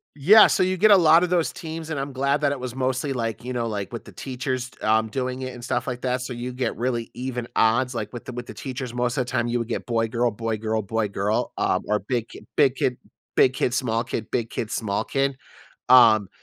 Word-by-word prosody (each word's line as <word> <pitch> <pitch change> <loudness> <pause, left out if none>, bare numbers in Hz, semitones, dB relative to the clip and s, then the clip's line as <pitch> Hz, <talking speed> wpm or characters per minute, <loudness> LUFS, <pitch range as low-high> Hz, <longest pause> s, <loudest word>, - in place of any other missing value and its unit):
Yeah, 200 +10 +8
so - - +2
you 185 0 +1
get 215 +4 +5
a 200 - +9
lotta 165 0 +6
those 175 -2 +1
teams 160 0 -7
and 155 -4 -2
I'm 140 0 -4
glad 140 +2 +1
that 145 -1 +2
it 140 - -3
was 125 -1 -6
mostly, 130 +1 -1
like, 115 -2 -3
you 125 - -5
know, 120 -2 -1
like, 100 -3 -4
with - - -7
the - - -12
teachers, 130 -1 -4
t - - -23
um, 110 +1 +2
doing 130 +2 -3
it 130 -1 -5
and 120 - -10
stuff 130 - -2
like 125 -1 -4
that, 125 0 -1
so 125 0 -5
you 125 +1 -5
get 125 -2 -2
really 120 -1 -2
even 125 -1 -4
odds, 120 +3 +2
like, 110 -1 -4
with 120 - -8
the - - -6
with 120 0 -6
the - - -9
teachers 130 -2 -6
most 125 0 -1
of 130 - +1
the 125 - -8
time 120 -2 0
you 120 +1 0
would 115 -1 -3
get - - -4
boy 115 -1 +1
girl, 120 +2 +1
boy 115 0 -3
girl, 110 0 -2
boy 110 +2 -1
girl, 100 +2 -1
um, - - +1
or 105 - +2
big 120 +2 -2
ki - - -11
big 140 -3 +4
kid, 125 -2 0 0.4
big 130 - +5
kid, 125 - 0
small 115 -3 0
kid, 115 -2 -5
big 115 -2 -1
kid, 110 - -3
small 105 -4 -1
kid. 135 0 -1 0.6
Um, 110 -6 +7
125 Hz, 255 wpm, -24 LUFS, 115-135 Hz, 0.6 s, a